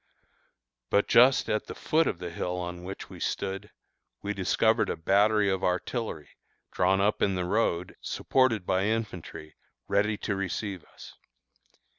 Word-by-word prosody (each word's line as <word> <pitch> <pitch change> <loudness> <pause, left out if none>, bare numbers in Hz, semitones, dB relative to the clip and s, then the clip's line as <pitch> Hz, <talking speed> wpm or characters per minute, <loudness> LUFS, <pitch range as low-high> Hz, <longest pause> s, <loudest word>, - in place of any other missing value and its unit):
But 100 - +2
just 125 +3 +5
at 105 - -1
the - - -7
foot 160 +1 +1
of - - -1
the 90 -1 -6
hill 90 +1 -3
on 90 0 -5
which 95 +2 -7
we - - -10
stood, 100 +1 -3 0.5
we 105 +1 -2
discovered 110 +4 +2
a - - -2
battery 100 +5 +3
of 95 -1 0
artillery, 90 - -2 0.4
drawn 95 +1 +2
up 105 +2 +1
in 100 -2 +2
the 90 -1 -1
road, 90 -3 0
supported 120 -8 +1
by 95 +2 +1
infantry, 90 -8 -4 0.3
ready 105 +1 +1
to 100 - -2
receive 95 -1 -3
us. - - -13
100 Hz, 150 wpm, -28 LUFS, 90-105 Hz, 0.5 s, just